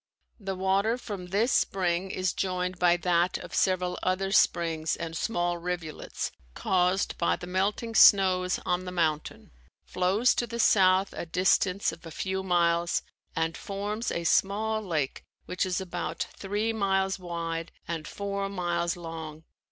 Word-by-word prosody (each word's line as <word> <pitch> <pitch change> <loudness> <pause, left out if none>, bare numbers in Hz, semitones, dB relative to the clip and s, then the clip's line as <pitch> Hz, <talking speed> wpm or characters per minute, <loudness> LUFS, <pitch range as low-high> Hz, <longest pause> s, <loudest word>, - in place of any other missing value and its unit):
The 195 -2 -4
water 195 +5 +1
from 200 -7 -7
this 210 +7 +1
spring 185 -1 +1
is 185 -1 -1
joined 180 -1 -2
by 175 -1 +4
that 175 0 +1
of - - -10
several 180 -1 +1
other 190 +1 0
springs 165 -5 +2
and 165 -1 -5
small 175 -3 -1
rivulets 175 -3 -4 0.2
caused 185 +1 +1
by 170 - +2
the - - -8
melting 200 +5 -1
snows 185 -4 +5
on 180 +1 0
the 180 - -5
mountain, 160 -4 -2 0.3
flows 190 +7 +2
to 240 - -1
the 235 +1 -5
south 190 -3 +4
a - - -5
distance 185 +2 +2
of 165 - -12
a 165 - -8
few 190 +4 -3
miles, 170 -2 +1 0.3
and 165 0 0
forms 210 +2 -3
a 170 - -2
small 215 +5 +1
lake 160 -9 -2 0.2
which 180 +1 -1
is 185 0 -1
about 190 -2 -3
three 210 +3 -1
miles 195 -2 0
wide 170 -2 -4 0.2
and 165 -2 -4
four 200 -1 -3
miles 175 -2 -1
long. 160 -2 -7
185 Hz, 150 wpm, -28 LUFS, 170-195 Hz, 0.3 s, snows